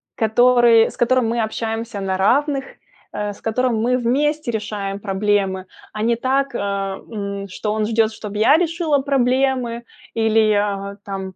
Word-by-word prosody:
который 235 0 +4
с - - -14
которым 245 -1 +2
мы 235 0 0
общаемся 225 0 -3
на 190 -1 -1
равных, 270 +7 +2 0.5
э, 205 0 -3
с - - -18
которым 235 +1 0
мы 250 +2 +2
вместе 280 +3 0
решаем 210 -2 -4
проблемы, 195 -2 -1 0.3
а 215 - -4
не 235 +1 +2
так, 265 +2 0
э, - - 0
м, 200 0 -4
что 210 +2 -3
он 215 0 0
ждет, 225 0 +1
чтоб 210 -1 -8
я 220 +8 +5
решила 330 -3 +1
проблемы 255 -3 0 0.3
или, 220 -1 +3
а, 200 -1 -2
там, 195 -1 -4
225 Hz, 155 wpm, -20 LUFS, 205-250 Hz, 0.5 s, я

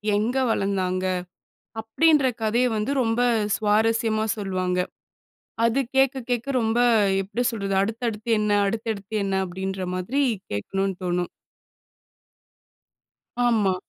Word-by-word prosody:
எங்க 230 +5 0
வளர்ந்தாங்க? 185 -2 -1 0.8
அப்டின்ற 295 +5 +3
கதைய 230 +3 +2
வந்து 215 +6 -1
ரொம்ப 230 0 +1 0.3
சுவாரஸ்யமா 220 +1 +1
சொல்லுவாங்க. 185 -2 -1 0.9
அது 230 +3 +2 0.2
கேட்க, 270 0 +3
கேட்க 245 +2 -1
ரொம்ப 225 +1 +1 0.4
எப்பிடி 205 +6 -3
சொல்றது, 195 -3 -2
அடுத்தடுத்து 225 +1 -3
என்ன, 210 0 0 0.2
அடுத்தடுத்து 220 -1 -4
என்ன? 195 -1 -1
அப்டின்ற 190 +1 -4
மாரி 230 +11 0 0.3
கேட்கணும்னு 195 - -2
தோணும். 175 0 -1 2.2
ஆமா. 210 -6 +2
215 Hz, 100 wpm, -24 LUFS, 195-230 Hz, 2.2 s, அப்டின்ற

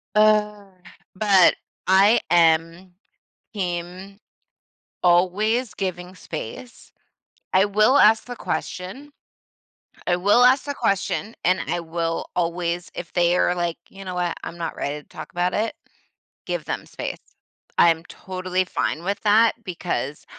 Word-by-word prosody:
Ugh. 210 -2 +2 0.4
But 195 -2 +5 0.3
I 195 +5 +5
am 165 +2 +2 0.6
team 185 0 -5 0.9
always 205 +7 +2
giving 180 -1 -4
space. 175 - -9 0.6
I 190 +1 +5
will 215 +6 +4
ask 220 -3 +5
the 245 - -7
question. 235 +8 -5 1.0
I 175 - +2
will 205 +7 +4
ask 255 +2 +5
the 285 - -4
question, 200 0 -1
and 185 +2 +3
I 175 - -1
will 165 0 -3
always 175 0 -2
if 170 - -7
they 175 0 +2
are 180 - +2
like, 175 -1 -2
"You 195 0 -11
know 185 -1 -5
what? 175 -1 -1
I'm 170 - -7
not 170 -1 -5
ready 150 +1 -4
to - - -31
talk - - -9
about 175 +1 0
it." 220 +2 -1 0.7
Give - - -3
them - - -4
space. - - -5 0.6
I'm 165 -1 +4
totally 185 0 -3
fine 170 -2 -2
with 200 +2 -2
that 220 +2 +4
because 160 -6 -4
185 Hz, 130 wpm, -23 LUFS, 175-210 Hz, 1.0 s, But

